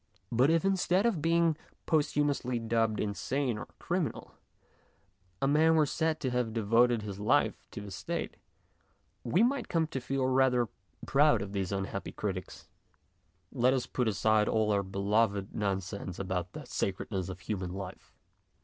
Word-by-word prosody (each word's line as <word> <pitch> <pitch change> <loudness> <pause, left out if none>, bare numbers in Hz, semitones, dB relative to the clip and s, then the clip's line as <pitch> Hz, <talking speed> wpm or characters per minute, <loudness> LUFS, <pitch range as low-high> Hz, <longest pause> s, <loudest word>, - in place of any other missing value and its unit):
But 125 +4 +4
if 165 +3 +2
instead 190 +1 +2
of 210 -10 +1
being 165 0 +3 0.3
posthu 150 -2 +2
mously 125 -5 -1
dubbed 115 -1 +1
insane 120 +3 -1
or - - -7
a - - -27
criminal - - -3 1.1
a 135 - +1
man 160 +3 +4
were 155 -1 +5
said 160 +2 0
to 130 - -1
have 125 -3 -1
devoted 115 +1 +3
his 100 -2 -6
life 105 - +1
to - - -7
the 100 -1 -8
State, 95 - -4 0.9
we 175 - +3
might 265 +2 +1
come 165 -1 +2
to 135 -4 -5
feel 135 +1 -1
rather 130 -3 +3 0.4
proud 140 -7 +4
of 100 - -7
these 95 -2 -2
unhappy 100 0 -3
critics. 95 -4 -5 0.8
Let 125 +2 +3
us 130 - -1
put 125 -2 -1
aside 110 0 +2
all 110 -1 +2
our 100 -1 +2
beloved 100 +1 0
nonsense 95 -2 -3
about 90 -2 -3
the - - -8
sacredness 95 -1 -2
of 95 -1 -7
human 95 -1 -3
life. 95 0 -8
115 Hz, 160 wpm, -30 LUFS, 100-145 Hz, 1.1 s, were